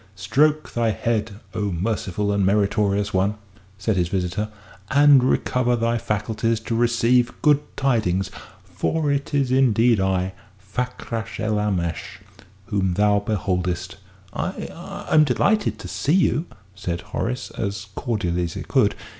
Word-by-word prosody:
"Stroke 145 +10 +1
thy 115 -1 +1
head, 110 0 -1
O 105 -2 -1
merciful 100 +2 -1
and 100 -1 +1
meritorious 100 +1 +1
one," 95 +3 +1 0.4
said 100 0 0
his 90 -1 +2
visitor, 95 +3 -2 0.4
"and 140 -1 +6
recover 125 -1 +1
thy 115 0 0
faculties 110 +2 -1
to 115 - -4
receive 120 +1 +2
good 150 -2 +5 0.2
tidings. 110 -9 +1 0.3
For 155 -3 -1
it 140 0 -1
is 135 -3 +1
indeed 120 -3 +4
I 95 -1 0 0.3
Fakrash 115 +2 -4
el 110 -1 0
Aamash 90 -5 -2 0.5
whom 95 -4 0
thou 105 +1 +3
beholdest." 90 -4 -2 0.4
"I - - -3 0.4
I'm 155 - +6
delighted 200 - +1
to - - -8
see 150 - 0
you," 175 -2 +2 0.3
said 90 -3 -4
Horace, 125 +1 -4
as 100 -1 -4
cordially 90 -9 -1
as 85 - -6
he - - -4
could. - - +2
105 Hz, 135 wpm, -23 LUFS, 95-125 Hz, 0.5 s, and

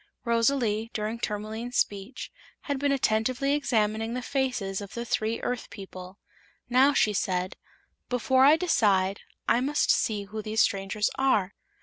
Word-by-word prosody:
Rosalie, 230 -2 +1
during 220 +2 -2
Tourmaline's 220 +3 -4
speech, 205 +5 -2 0.3
had 285 -3 -3
been 285 0 +1
attentively 255 +2 +1
examining 225 -5 0
the 250 - -3
faces 250 -9 -1
of 200 - -9
the 235 0 -4
three 225 -1 -1
Earth 245 -2 -3
people. 185 -1 -10 0.5
Now 260 +3 +4
she 210 - +3
said: 185 -1 -1 0.5
"Before 260 +1 +3
I 290 +3 +8
decide 200 - +2 0.3
I 235 - +3
must 290 +3 +2
see 210 -2 +1
who 215 +2 -6
these 215 +1 0
strangers 200 +1 0
are. 215 -8 +2
225 Hz, 140 wpm, -27 LUFS, 205-255 Hz, 0.5 s, I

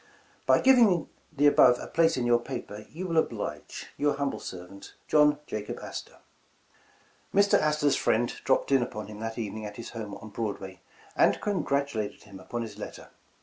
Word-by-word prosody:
*' - - -33
'By - - +5
giving 230 - +5 0.2
the 145 -2 +1
above 125 -4 +6
a - - -7
place 165 -1 +2
in 125 - 0
your 120 0 +4
paper, 105 -2 -7
you 180 +4 -6
will 165 -3 -1
oblige, 160 - -2
'' - - -33
'Your 145 -1 +1
humble 140 -1 -2
servant, 90 +2 -10
'' - - -38
'JOHN 150 -1 +5
JACOB 105 -5 -5
ASTOR.' - - -8 0.4
' - - -34
' - - -35
Mr. 200 0 +5
Astor 150 -1 +2
's - - +3
friends 120 +2 +1
dropped 135 +2 +1
in 135 -2 +5
upon 110 -3 -4
him 105 0 -10
that 115 +1 -5
even 110 -2 -4
ing 110 - -6
at 105 - -10
his 115 - -7
home 105 -3 -6
on 110 - -10
Broadway, 100 -4 -5 0.3
and - - +4
congratulated 140 - -1
him 100 -2 -12
upon 120 +5 -4
his 105 -2 -9
letter. - - -8
120 Hz, 200 wpm, -28 LUFS, 105-150 Hz, 0.4 s, above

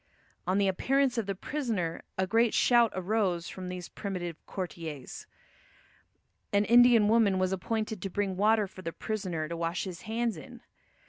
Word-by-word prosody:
On 185 +1 +2
the 200 -1 +3
appearance 260 +6 +1
of 215 - -3
the 195 - -2
prisoner 210 - -3 0.2
a 190 - +2
great 225 +3 +2
shout 240 -2 +4
arose 185 -2 0
from 185 -1 -7
these 180 -1 -6
primitive 180 -5 -5
courtiers. 165 -7 -6 1.2
An 205 +1 +3
Indian 240 -2 +6
woman 215 -3 +4
was 185 0 +1
appointed 215 +1 -2
to 195 - -3
bring 195 0 -1
water 215 +2 +3
for 185 -1 -11
the 165 -2 -5
prisoner 185 -8 -3
to 170 - -4
wash 170 +1 -2
his 185 -2 -7
hands 225 -2 -2
in. 155 - -11
195 Hz, 160 wpm, -29 LUFS, 180-225 Hz, 1.2 s, Indian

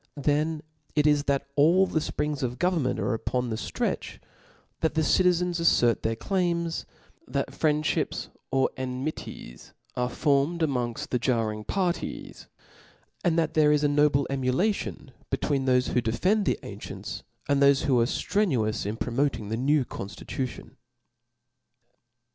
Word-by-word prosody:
Then 150 +2 0 0.3
it 150 -1 +3
is 150 -1 +3
that 140 -1 +1
all 165 +6 +5
the 160 - 0
fprings 150 -1 -2
of 125 -1 -2
government 175 -7 +1
are 125 - 0
upon 125 +2 -2
the - - -1
ftretch, 110 - -3 0.6
that 160 - 0
the 160 - +2
citizens 180 0 +2
aiTert 120 -8 +3
their 115 0 0
claims, 170 - -1 0.4
that - - -2
friendfhips 150 0 0 0.2
or 135 0 +2
enmities 130 - -6 0.2
are 125 0 0
formed 145 +5 +1
amongft 125 -6 -1
the 125 - 0
jarring 115 -4 0
parties, 180 - -3 0.8
and 170 -2 +2
that 160 -2 +1
there 150 -1 +5
is 150 0 +2
a - - +5
no* 145 +1 +4
ble 140 -1 +1
emulation 135 +4 -1 0.2
between 135 -2 0
thofe 125 0 +3
who 125 - +1
defend 180 - +1
the - - +2
an - - -8
cient^ - - -7 0.3
and 140 0 +2
thofe 140 0 +5
who 130 -4 +3
are - - +4
ftrenuous 120 - 0
in 105 +2 -3
promoting 125 -3 -1
the 110 - -1
new 140 +2 +2
confticution. 120 +6 -6
140 Hz, 145 wpm, -27 LUFS, 125-160 Hz, 0.8 s, all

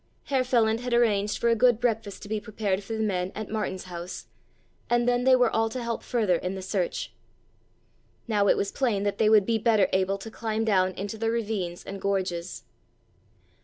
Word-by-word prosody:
Herr 270 -2 +1
Feland 230 -3 +2
had 245 0 -1
arranged 210 -3 +2
for 235 - +1
a 230 - +4
good 240 0 +4
breakfast 225 -5 -2
to - - -8
be 215 +1 -2
prepared 205 -3 -2
for 225 - -6
the 220 0 -1
men 185 -3 -1
at 215 0 -6
Martin's 210 -4 -3
house, 175 0 -7 0.6
and 240 0 +2
then 245 0 +2
they 260 0 +7
were 250 -2 +3
all 225 0 +1
to 245 +2 -5
help 235 -1 -3
further 210 -8 +1
in 180 +3 -4
the 190 - -6
search. 190 -2 -2 1.1
Now 205 -3 +2
it - - +4
was 200 - -1
plain 225 -7 0
that 205 -1 -2
they 215 - +4
would 215 -3 +5
be 225 0 +1
better 220 -3 +3
able 190 +1 +1
to 220 +3 -9
climb 220 0 -2
down 190 -3 +2
into 200 +4 -6
the 225 0 0
ravines 210 -6 -2
and 195 0 -7
gorges. 185 - -2
215 Hz, 200 wpm, -26 LUFS, 195-230 Hz, 1.1 s, they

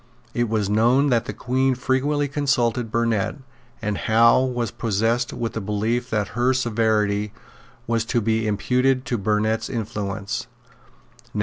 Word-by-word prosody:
It 120 -1 0
was 105 -3 0
known 120 +7 +3
that 120 -1 +2
the - - -4
Queen 130 +1 0
frequently 140 +3 0
consulted 125 -5 0
Burnet; 115 -3 0 0.5
and 105 -2 -1
Howe 115 +3 +4
was 120 -3 -2
possessed 115 +1 0
with 115 -1 -4
the 110 - -3
belief 110 +5 -1
that 105 -4 -1
her 125 +2 +1
severity 105 -4 0 0.5
was 115 -1 0
to 120 0 +1
be 110 0 0
imputed 125 +5 +1
to 120 -2 -1
Burnet's 110 +2 0
influence. 105 0 -4
115 Hz, 135 wpm, -23 LUFS, 110-125 Hz, 0.5 s, Howe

